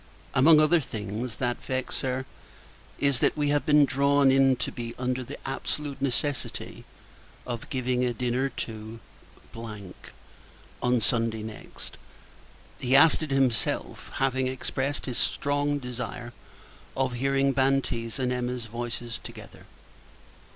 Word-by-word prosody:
Among 150 +4 +7
other 155 +3 +5
things 110 -2 -4
that 120 0 -2
vex 130 -1 -2
her, 130 0 -2 0.7
is 140 -3 +2
that - - +2
we 145 -1 +1
have 145 +2 +1
been 150 -1 +7
drawn 140 +1 +4
in 135 0 +5
to 125 - -2
be 120 -1 -6
under 130 0 -1
the - - -8
absolute 140 +1 -3
necessity 140 +1 -2 0.6
of 120 -2 -5
giving 125 -1 0
a 125 - +2
dinner 125 +3 0
to 110 -2 -6 0.5
on 115 +3 -6
Sunday 115 0 +1
next. 110 -1 -8 0.8
He 130 +1 +2
asked 155 +4 +7
it 155 - -3
himself; 135 -4 0
having 130 -1 +1
expressed 130 +2 -2
his 125 -3 -1
strong 145 0 +1
desire 125 -2 -6 0.6
of 130 -1 +1
hearing 135 +2 +2
Banti's 130 -3 +1
and 130 -2 0
Emma's 125 -1 -2
voices 120 0 -4
together. - - -11
130 Hz, 125 wpm, -27 LUFS, 120-135 Hz, 0.8 s, Among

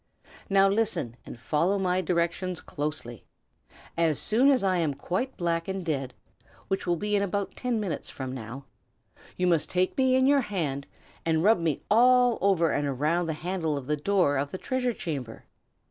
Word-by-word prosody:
Now 195 0 +5
listen, 195 - 0
and 120 - -9
follow 170 +10 +1
my 185 -1 +1
directions 175 0 -1
closely. 145 -6 -5 0.7
As 165 -3 +2
soon 245 +6 +3
as 260 -6 +3
I 185 -2 +2
am 155 -5 0
quite 185 - -3
black 170 -2 -1
and 190 -2 -4
dead, 135 -5 -2 0.5
which 195 -1 -2
will 175 - +2
be 210 +4 -1
in 200 - +2
about 200 0 -2
ten 245 -3 -1
minutes 195 -6 -4
from 130 -1 -6
now, 130 +2 -8 0.7
you 180 - +1
must 170 -3 +2
take 185 0 0
me 260 -1 +4
in 260 0 +4
your 280 0 +4
hand 155 - -3 0.4
and 160 -1 +1
rub 215 -1 +5
me 160 -4 -1
all 245 +1 +5
over 180 -5 +3
and 145 0 0
around 155 +6 0
the 160 - -1
handle 170 -5 -1
of 135 - -6
the 150 +3 0
door 150 -2 +2
of 140 +1 -2
the 185 - -5
treasure 250 +3 -1
chamber. 135 - -5
175 Hz, 180 wpm, -27 LUFS, 150-200 Hz, 0.7 s, Now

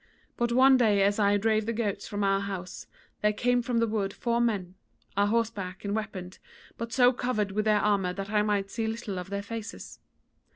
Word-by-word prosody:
But 240 0 0
one 260 +2 +6
day 210 -5 +3
as 205 +2 +2
I 205 0 +4
drave 215 +1 +1
the 230 - 0
goats 210 -3 -2
from 205 -1 -3
our 195 0 +2
house 195 -2 -6 0.3
there 210 - +3
came 245 +3 +1
from 240 0 -2
the 230 - +3
wood 210 -3 -2
four 235 0 0
men, 200 -7 -1 0.4
a 200 +1 +3
horseback 210 -4 -2
and 200 +1 -1
weaponed, 195 -4 -5 0.4
but 230 0 -6
so 250 +1 +5
covered 225 -5 -1
with 215 +2 -1
their 215 -1 +4
armour 200 -3 +1
that 195 +2 -6
I 210 -1 +3
might 205 -2 0
see 225 -1 -2
little 220 -4 -4
of 180 - -7
their 200 0 -3
faces. 225 +1 -7
210 Hz, 205 wpm, -28 LUFS, 200-230 Hz, 0.4 s, one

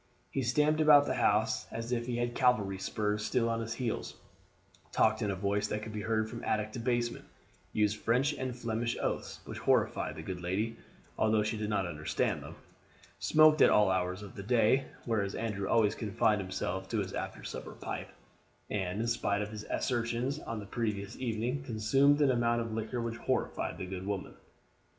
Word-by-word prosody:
He 135 - -1
stamped 150 +6 +2
about 150 -2 +7
the - - 0
house 105 +2 +2
as 115 +1 -5
if 120 -1 -1
he 120 -1 -1
had 120 0 -1
cavalry 110 -7 +2
spurs 105 +1 -1
still 115 +1 +1
on 115 0 0
his 115 0 -4
heels; 120 -4 -3 0.8
talked 110 +1 +3
in 105 - 0
a 95 - 0
voice 100 +2 0
that 105 0 -3
could 110 - -7
be 105 - -3
heard 110 0 0
from 115 +1 -7
attic 110 0 0
to 120 - -6
basement; 120 0 -1 0.5
used 105 0 +1
French 125 +7 +2
and 130 -3 -4
Flemish 115 0 -2
oaths - - -3
which - - -6
horrified - - +1
the - - -7
good 90 -2 -5
lady, 105 +6 -1 0.4
although 110 -1 +3
she 110 +1 -1
did 105 -1 -3
not 100 -3 +1
understand 75 -3 -1
them; - - -9 0.6
smoked 155 +10 +5
at - - +8
all 105 -2 +5
hours 95 +1 -1
of 100 - -10
the - - -7
day, 125 +5 +3 0.2
whereas 105 -4 0
Andrew 105 -4 -2
always 110 -2 +4
confined 110 -1 +1
himself 95 0 -3
to 115 - -1
his 95 -2 -2
after - - -5
supper - - -6
pipe, - - -5 0.6
and, 95 0 -1
in 115 - -1
spite 105 -3 0
of 105 - -6
his 110 -1 -7
assertions 120 +3 -1
on 115 -6 -5
the 100 - -7
previous 105 -1 -3
evening, 120 +2 -2
consumed 135 +4 +3
an 140 -2 +5
amount 120 -1 +2
of 115 -1 -3
liquor 110 +2 -3
which 115 0 -3
horrified 130 +2 -1
the - - -4
good 95 +1 -6
woman. 100 -2 -3
110 Hz, 190 wpm, -31 LUFS, 105-120 Hz, 0.8 s, at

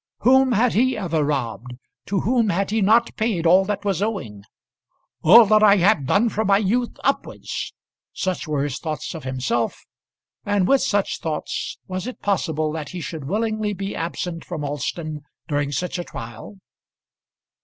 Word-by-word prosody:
Whom 260 +1 +5
had 235 +3 +2
he 255 +3 +2
ever 165 -6 0
robbed? 125 -4 -3 0.3
To 195 -1 0
whom 230 -1 +2
had 195 +2 0
he 220 0 +1
not 225 +4 +3
paid 215 -7 0
all 185 +3 +6
that 205 0 -3
was 195 -2 0
owing? 150 - -3 0.8
"All 225 +8 +8
that 215 +1 +4
have 205 -1 +5
I - - -9
done 200 - +2
from 220 -1 -1
my 195 0 +5
youth 230 +4 0
upwards." - - -2 0.4
Such 185 -3 -3
were 150 -2 0
his 145 -3 -3
thoughts 155 -2 -4
of 160 -5 -8
himself; 130 -3 -2 0.6
and 205 -3 +1
with 275 -1 +4
such 205 -1 0
thoughts 155 -2 -4
was 185 +2 -4
it 255 - -7
possible 160 -6 0
that 155 -2 -5
he 180 - -6
should 160 -3 -6
willingly 215 +4 -1
be 195 +1 -5
absent 165 0 -4
from 165 -4 -5
Alston 150 +2 -4 0.3
during 145 -1 -1
such 180 +5 -2
a - - -2
trial? 115 - -9
185 Hz, 165 wpm, -22 LUFS, 150-215 Hz, 0.8 s, All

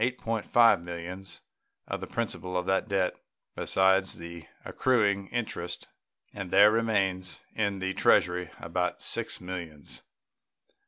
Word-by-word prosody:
5 115 -2 +3
millions 90 +2 -7 0.5
of - - -4
the - - -5
principal 95 -5 -3
of 90 - -1
that 95 +3 +1
debt, 95 -2 +1 0.4
besides 95 0 +2
the 85 0 -9 0.2
accruing 100 -6 +1
interest; 90 -7 -4 0.4
and 100 -3 -6
there 100 +3 +7
remain 105 -5 +1 0.3
in 100 -2 0
the 95 0 -2
Treasury 90 -1 +3
nearly 85 0 -11
$6 90 0 -1
millions. 85 -5 -7
95 Hz, 115 wpm, -28 LUFS, 90-100 Hz, 0.5 s, there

